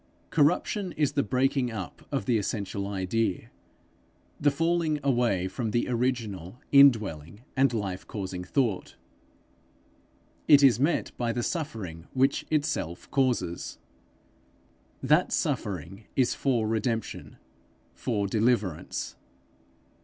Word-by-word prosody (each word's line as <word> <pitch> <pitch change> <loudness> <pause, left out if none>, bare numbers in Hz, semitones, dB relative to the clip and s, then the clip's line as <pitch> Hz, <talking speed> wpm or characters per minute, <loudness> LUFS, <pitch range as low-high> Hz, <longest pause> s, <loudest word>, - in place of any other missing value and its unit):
Corruption 175 +5 +2
is 145 -2 +1
the 145 - +1
breaking 135 -1 +1
up 100 -8 -7
of - - -1
the 115 -1 +2
essential 100 -1 -3
idea; 100 +1 -1 0.9
the 145 - +4
falling 165 +1 +1
away 120 -9 +2
from 115 +3 -3
the 120 +3 0
original 115 -6 -2
indwelling 105 - +4
and 135 -2 +4
life 100 -5 -3
causing 95 -3 -5
thought. 110 0 -1 1.5
It 145 -2 +7
is 125 -5 +6
met 150 +5 +1
by 120 -1 0
the 120 +1 -2
suffering 105 - -4
which 135 +1 +1
itself 145 - -2
causes. 120 - 0 1.3
That 150 +7 +3
suffering 100 - -2
is 130 -2 +3
for 120 -5 0
redemption, 115 0 -2 0.6
for 105 -4 -1
deliverance. 105 -4 0
120 Hz, 110 wpm, -28 LUFS, 100-140 Hz, 1.5 s, It